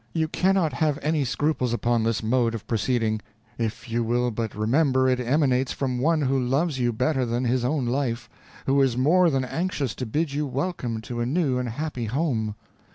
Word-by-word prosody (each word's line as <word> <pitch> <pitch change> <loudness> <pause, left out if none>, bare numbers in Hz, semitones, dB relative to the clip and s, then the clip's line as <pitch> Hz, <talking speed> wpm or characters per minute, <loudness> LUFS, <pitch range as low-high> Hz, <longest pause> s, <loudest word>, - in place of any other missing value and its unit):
You 160 -1 +1
cannot 180 -3 +1
have 150 +2 +1
any 155 -1 +1
scruples 130 -2 0
upon 120 0 +1
this 115 0 0
mode 115 0 +1
of 110 - -7
proceeding, 115 -1 0 0.4
if 115 +2 -3
you 115 0 0
will 120 +1 +1
but 110 -1 -3
remember 130 +4 +2
it 130 -1 +2
emanates 130 0 +1
from 130 -3 -2
one 155 +3 +2
who 135 0 +1
loves 135 +3 0
you 120 -1 +2
better 130 +4 0
than 120 +1 -1
his 125 0 +1
own 135 +1 0
life 120 -1 -1 0.4
who 140 +1 +3
is 130 -3 +2
more 170 +7 +4
than 135 -3 0
anxious 150 -4 -2
to 125 - -3
bid 150 +5 -1
you 150 +1 -1
welcome 130 -5 -3
to 120 +2 -6
a 120 - 0
new 135 -3 +1
and 125 -1 -2
happy 130 -1 -4
home. 115 -4 -1
130 Hz, 195 wpm, -25 LUFS, 120-150 Hz, 0.4 s, more